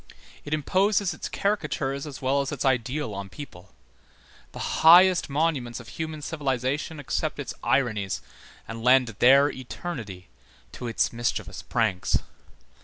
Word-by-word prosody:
It 145 - -9
imposes 190 +5 +1
its - - -6
caricatures 150 -8 -2
as 145 -1 -9
well 135 +2 +2
as 140 - -4
its 140 -3 -3
ideal 130 -1 0
on 100 0 -6
people; 95 -6 -11 0.8
the - - -4
highest 180 +2 +7
monuments 140 -5 -1
of 120 - -11
human 155 -1 -5
civilization 145 0 -2
accept 135 -4 -2
its - - -5
ironies 110 -8 0 0.4
and 115 0 -7
lend 125 0 +5
their 140 +3 +6
eternity 120 - -7 0.4
to 125 - -7
its 115 - 0
mischievous 120 0 -3
pranks. 110 -6 0
135 Hz, 130 wpm, -26 LUFS, 120-155 Hz, 0.8 s, highest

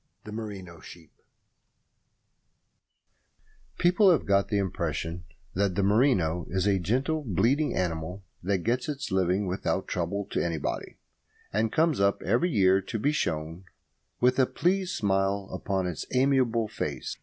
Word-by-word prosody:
THE 105 - -9
MERINO 100 -6 -7
SHEEP 80 -1 -13 2.7
People 185 +3 +5
have 165 - +2
got 100 0 +3
the 105 - 0
impression 90 -2 -2 0.3
that 100 -1 0
the 100 - +1
merino 100 - +2
is 95 0 0
a 100 -2 +3
gentle, 130 - 0
bleating 120 - +1
animal 90 +1 -3 0.2
that 95 -1 -1
gets 125 +5 0
its 140 -7 -4
living 95 +1 +1
without 95 +1 -2
trouble 95 +3 -2
to - - 0
anybody, 80 -4 -3 0.6
and 110 +2 +1
comes 160 -4 +2
up 100 0 +2
every 120 - +2
year 95 - +4
to 105 +4 -4
be 140 +7 +1
shorn 80 - -2 0.5
with 125 +2 +3
a 130 - +5
pleased 185 +1 0
smile 95 -1 0
upon 95 0 -1
its 90 -3 -4
amiable 125 -4 +2
face. - - -4
100 Hz, 140 wpm, -27 LUFS, 90-125 Hz, 2.7 s, People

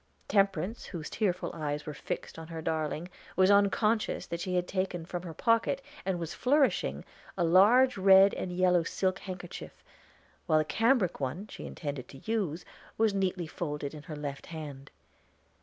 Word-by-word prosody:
Temperance, 195 +1 +1
whose 165 -4 -6
tearful 185 -4 -1
eyes 150 -2 -3
were 150 - -5
fixed 145 - -5
on 160 - -8
her 165 0 -6
darling, 160 +1 -2 0.3
was 190 +1 +5
unconscious 210 +2 +2
that 170 - -4
she 180 +1 -2
had 180 0 +1
taken 185 -3 -2
from 175 0 -4
her 170 -2 -7
pocket, 230 +3 +2 0.3
and 190 -2 +1
was 170 -2 -4
flourishing, 250 - +1 0.3
a - - +2
large 210 +10 +6
red 195 +1 +7
and 180 - -4
yellow 180 -1 +3
silk 185 +3 -1
handkerchief, 180 -2 -8 0.6
while 155 -2 +4
the 155 - +2
cambric 225 - +2
one 145 +9 -3
she - - -8
intended 140 -5 -5
to 135 - -12
use 180 -7 -1 0.3
was 220 -2 +3
neatly 190 -2 0
folded 150 -3 -4
in 150 - -8
her 155 0 -8
left 145 -2 -6
hand. 145 -4 -8
180 Hz, 165 wpm, -30 LUFS, 155-195 Hz, 0.6 s, red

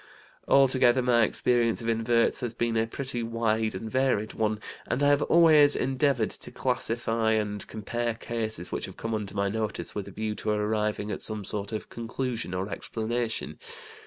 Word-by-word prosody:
Altogether 130 -2 +5
my 120 -1 +4
experience 115 +1 +2
of 115 - -5
inverts 115 +1 +2
has 120 -2 -4
been 115 -1 0
a 110 0 +2
pretty 130 0 -4
wide 115 -2 0
and 110 +4 -5
varied 130 -5 +1
one, 110 -1 0 0.3
and 130 +4 0
I 145 - +5
have 145 0 +4
always 155 -4 +6
endeavored 130 -2 +1
to - - -7
classify 115 -1 0
and 105 -2 -2
compare 115 +2 -3
cases 110 -6 -3
which - - -2
have 95 - -11
come 115 0 -3
under 105 -3 -4
my 100 0 +1
notice 110 +1 -3
with 100 -2 -4
a - - -8
view 110 0 -3
to 110 - -3
arriving 105 0 0
at 95 - -4
some 110 -2 -3
sort 100 +1 -3
of 110 - -5
conclusion 115 -4 -4
or 95 +2 -2
explanation. 115 +2 -3
115 Hz, 175 wpm, -27 LUFS, 110-120 Hz, 0.3 s, always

